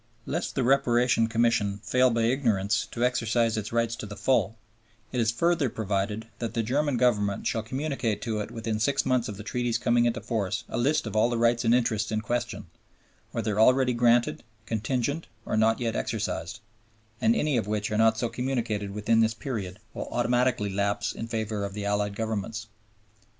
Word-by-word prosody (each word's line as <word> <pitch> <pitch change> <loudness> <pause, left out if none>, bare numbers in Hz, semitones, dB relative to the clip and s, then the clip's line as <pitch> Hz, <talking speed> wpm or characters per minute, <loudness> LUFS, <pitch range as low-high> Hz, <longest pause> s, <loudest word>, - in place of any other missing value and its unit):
Lest - - -3
the 135 - +1
Reparation 120 -3 +3
Commission 110 -3 +1
fail 125 +3 +3
by 115 -1 +1
ignorance 115 -5 +1
to 120 +1 0
exercise 115 -2 +1
its 110 -1 -4
rights 115 0 0
to 105 - -6
the 105 - -8
full, 110 -2 +1 0.5
it 125 - 0
is 110 - +2
further 160 +3 +1
provided 105 +1 -2
that 115 -1 -4
the 115 - +1
German 140 +3 0
Government 105 -5 +1
shall 110 - 0
communicate 130 -2 -2
to 110 -3 -2
it 105 - -4
within 110 -2 -3
six 135 +6 +1
months 130 -2 +1
of 105 - -6
the 105 - -7
Treaty's 120 +1 -1
coming 120 0 +2
into 120 0 0
force 105 -3 -2
a - - -5
list 145 +4 +2
of 110 - -5
all 110 +2 +4
the 120 - -1
rights 120 +1 +2
and 115 +1 +4
interests 110 -3 0
in 110 - 0
question, 120 +2 -3 0.7
"whether 110 -2 -1
already 130 +2 +5
granted, 120 0 +3 0.2
contingent 125 +8 -2 0.2
or - - -1
not 110 +1 +3
yet 115 -2 -1
exercised," 95 +7 -3 0.6
and 225 +1 +4
any 150 - +1
which 105 0 -2
are 105 - 0
not 110 0 +4
so 120 - 0
communicated 115 -5 -2
within 105 +3 +1
this 110 0 +2
period 105 -8 -5 0.2
will - - -5
automatically 120 -4 +1
lapse 100 +1 0
in 115 - -6
favor 110 -2 -2
of 100 0 -5
the 105 -1 -4
Allied 100 0 0
Governments. 110 0 -3
115 Hz, 185 wpm, -27 LUFS, 105-120 Hz, 0.7 s, already